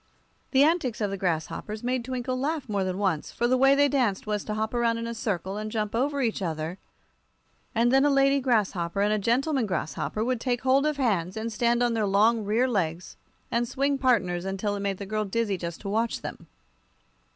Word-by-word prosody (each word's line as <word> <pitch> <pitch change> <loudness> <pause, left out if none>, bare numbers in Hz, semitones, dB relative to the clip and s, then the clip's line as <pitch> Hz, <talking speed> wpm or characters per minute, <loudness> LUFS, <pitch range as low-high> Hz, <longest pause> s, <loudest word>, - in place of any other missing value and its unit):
The 270 0 +5
antics 300 -7 +1
of 205 -2 -1
the 195 - -3
grasshoppers 185 +5 -3
made 250 0 -1
Twinkle 255 0 -3
laugh 285 +2 -2
more 200 -3 0
than 185 0 -2
once, 190 -7 -1
for 240 - 0
the 255 - +3
way 270 +2 +5
they 285 +1 +4
danced 250 -9 0
was 210 -1 -2
to 210 - -3
hop 220 +1 -2
around 235 -1 +1
in 230 - -4
a 235 - -3
circle, 200 -4 -3
and 215 0 -4
jump 215 -2 -2
over 275 +4 0
each 225 -3 -1
other, 160 0 -3 1.0
and 235 +2 +3
then 270 +1 +5
a 290 - +4
lady 275 0 +4
grasshopper 200 -8 0
and 210 +1 +2
a 215 - +1
gentleman 255 +3 +1
grasshopper 185 +3 -2
would 250 -2 -1
take 245 -2 -1
hold 270 +3 +3
of 300 -1 -1
hands 195 -8 0
and 225 +1 -3
stand 235 +2 +2
on 240 -1 +2
their 220 -2 0
long 215 +3 +3
rear 220 +5 +2
legs 175 -7 -2 0.4
and 235 0 +1
swing 275 +2 0
partners 190 -10 +2
until 195 +2 -2
it - - -4
made 200 -1 -2
the 200 - -6
girl 215 +2 -1
dizzy 210 0 -1
just 170 -2 -6
to 200 - -5
watch 225 +3 0
them. - - -8
225 Hz, 215 wpm, -26 LUFS, 200-255 Hz, 1.0 s, The